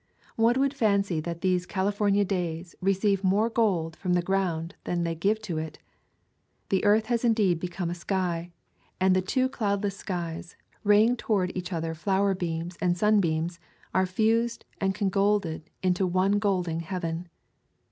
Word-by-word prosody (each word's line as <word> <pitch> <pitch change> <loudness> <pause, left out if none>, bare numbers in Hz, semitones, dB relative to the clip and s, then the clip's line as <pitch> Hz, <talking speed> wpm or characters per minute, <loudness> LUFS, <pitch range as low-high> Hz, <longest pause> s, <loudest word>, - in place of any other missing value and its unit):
One 230 +3 +3
would 275 0 +2
fancy 200 - +1
that 170 +1 -5
these 180 -1 +1
Cali 195 +1 0
fornia 205 -1 +2
days 175 -2 -3
receive 195 +1 +1
more 205 +5 +2
gold 180 -9 +1
from 180 +1 -1
the 175 -1 +2
ground 175 -3 -1
than 175 -1 -1
they 170 0 -1
give 200 +7 +1
to 170 -7 -3
it. 155 -1 -6 0.9
The 190 - +1
earth 215 +2 +4
has 240 0 0
indeed 210 -7 +3
become 175 0 -3
a - - -1
sky; 175 -1 -2 0.5
and 185 0 +4
the 185 - +3
two 255 +8 +1
cloudless 200 -5 -1
skies, 170 -3 -5 0.3
ray 205 0 +6
ing 240 +2 +2
toward 190 -6 0
each 180 0 -4
other 165 -1 -2
flower 195 +4 +1
beams 170 -1 -4
and 175 -1 +2
sun 210 +2 +4
beams, 165 -1 -1 0.3
are 185 0 +2
fused 225 +4 +1
and 190 -1 0
congolded 195 -4 0
into 185 0 +2
one 190 +3 +2
glow 195 -3 +1
ing 165 0 -2
heaven. 170 -1 -4
190 Hz, 165 wpm, -27 LUFS, 170-205 Hz, 0.9 s, ray